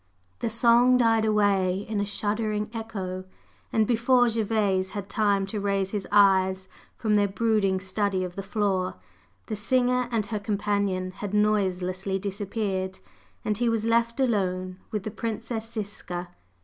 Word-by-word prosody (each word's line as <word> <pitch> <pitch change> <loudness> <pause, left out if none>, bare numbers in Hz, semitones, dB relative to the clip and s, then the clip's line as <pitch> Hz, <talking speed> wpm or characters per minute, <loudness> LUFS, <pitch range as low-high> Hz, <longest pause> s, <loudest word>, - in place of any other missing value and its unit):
The - - -1
song 235 +2 +5
died 225 -2 +3
away 200 -3 +2
in 215 -2 -1
a - - 0
shuddering 210 +1 -2
echo, 195 -5 -5 0.5
and 220 -1 +3
before 245 +2 +3
Gervase 210 -4 0
had 200 -1 -4
time 200 -2 +2
to 205 +2 -4
raise 195 -1 0
his 205 -3 -3
eyes 190 -2 +4 0.3
from 215 -2 0
their 205 -1 +4
brooding 200 -2 +1
study 190 0 -1
of 180 -1 -5
the 195 - -3
floor 195 -2 -1 0.5
the 215 - -3
singer 250 +3 +1
and 225 -3 0
her 215 -1 -3
companion 200 -2 -1
had 205 +2 -5
noiselessly 190 -2 +1
disappeared, 195 -1 -3 0.5
and 210 0 0
he 240 -1 +2
was 225 -1 0
left 230 +2 +1
alone 185 -7 0
with 210 -3 -3
the 215 - -4
Princess 225 +1 -4
Ziska. 195 -5 -5
205 Hz, 150 wpm, -26 LUFS, 190-225 Hz, 0.5 s, song